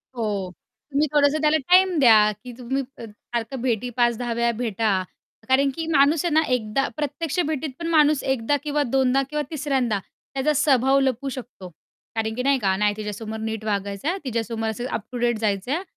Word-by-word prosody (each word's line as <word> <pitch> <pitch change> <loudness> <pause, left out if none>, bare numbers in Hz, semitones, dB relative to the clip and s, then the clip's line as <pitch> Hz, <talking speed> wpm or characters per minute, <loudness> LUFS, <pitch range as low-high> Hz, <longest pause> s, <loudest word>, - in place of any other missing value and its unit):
हो, 205 -5 -2 0.4
तुम्ही 295 +2 +2
थोडंसं 295 +1 +3
त्याला 305 +1 +4
टाईम 365 -1 +5
द्या, 215 -4 +6
की 250 - -8
तुम्ही 265 +2 -2
अ, - - -9
सारखं 230 +3 -6
भेटी 245 -1 -1
5-10 240 0 +1
वेळा 235 0 +1
भेटा 215 -5 0 0.5
कारण 275 +1 +4
की 325 - -3
माणूस 295 +1 +3
आहे 330 - 0
ना, 315 - +5
एकदा 240 +3 0
प्रत्यक्ष 300 +3 -2
भेटीत 310 -1 -2
पण 335 - -3
माणूस 305 -3 +3
एकदा 265 +1 0
किंवा 295 -1 0
दोनदा 265 +1 +2
किंवा 300 0 -2
तिसऱ्यांदा 265 -8 0
त्याचा 275 +9 -3
स्वभाव 270 -1 +3
लपवू 270 0 0
शकतो 240 -8 -8 0.5
कारण 220 0 -1
की 250 - -2
नाही 275 -1 +3
का, 190 -3 +1
नाही 210 0 +2
तिच्यासमोर 215 +1 -5
नीट 220 -1 -4
वागायचं 200 +3 -2
आहे 380 - -1
तिच्यासमोर 225 -2 -2
असं 240 +3 -4
अप 220 - -2
टू 245 - -5
डेट 240 -1 +1
जायचं 205 +2 -1
आहे. 345 +6 -1
250 Hz, 185 wpm, -23 LUFS, 220-285 Hz, 0.5 s, द्या